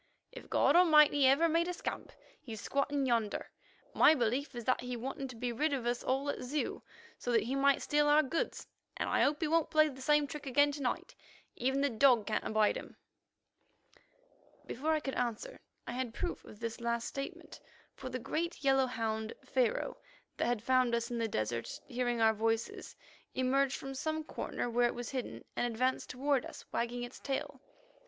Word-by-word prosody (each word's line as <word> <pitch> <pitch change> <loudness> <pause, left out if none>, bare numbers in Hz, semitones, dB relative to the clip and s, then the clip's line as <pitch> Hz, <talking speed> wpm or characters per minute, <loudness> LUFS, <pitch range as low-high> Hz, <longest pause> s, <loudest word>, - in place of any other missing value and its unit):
"If - - -11
God - - +3
Almighty 300 -5 +6
ever 280 +6 +5
made 335 +1 +2
a 360 - -2
scamp, - - -5 0.3
he's 225 -4 -7
squatting 280 +3 0
yonder. 230 -4 0 0.4
My 315 - +6
belief 255 +2 -1
is 240 -2 -6
that 255 - +2
he 250 0 -4
wanted 270 +2 -5
to 255 - -9
be 245 +1 -2
rid 290 +5 0
of 260 -4 -2
us 240 0 -1
all 270 +2 0
at - - -7
Zeu, 275 +4 -2 0.4
so 245 - -2
that 230 -3 +3
he 245 +4 -3
might 275 0 +3
steal 295 0 +2
our 300 +1 +6
goods, 320 +5 -2 0.3
and - - -1
I - - +2
hope 295 +1 +2
he 320 - +1
won't 325 0 +2
play 310 0 +4
the 265 -2 -10
same 295 +2 +3
trick 290 0 -7
again 285 +3 +4
to 285 0 -6
night. 250 - -2 0.4
Even 265 +3 0
the 285 - +2
dog 240 -2 +4
can't 215 - -1
abide 215 -1 +2
him." - - -10 1.7
Before 300 +6 -2
I 310 - +1
could 270 - -4
answer, 245 - -3 0.3
I - - -5
had 245 -2 -3
proof - - -3
of 210 - -13
this 230 0 -5
last 235 0 -1
statement, 275 0 -7 0.3
for 260 - -7
the 255 - -3
great 320 +7 -3
yellow 270 -1 +4
hound, 220 -2 -2
Pharaoh, 250 -4 0 0.4
that - - 0
had 240 -3 -1
found 255 -1 +3
us 235 +1 -2
in 235 - -2
the 225 - 0
desert, 115 - -3
hearing 245 -2 -1
our 220 0 +5
voices, 225 +1 -2 0.4
emerged 265 +1 +2
from 270 0 -6
some 315 +3 -2
corner 300 - -4
where 240 0 +3
it - - -4
was 240 -1 -5
hidden, 255 -3 -5
and 245 - +1
advanced 255 +3 0
toward 270 0 +1
us, - - -10
wagging 240 +1 -2
its 245 +1 -8
tail. 270 -1 -4
255 Hz, 195 wpm, -33 LUFS, 235-285 Hz, 1.7 s, Almighty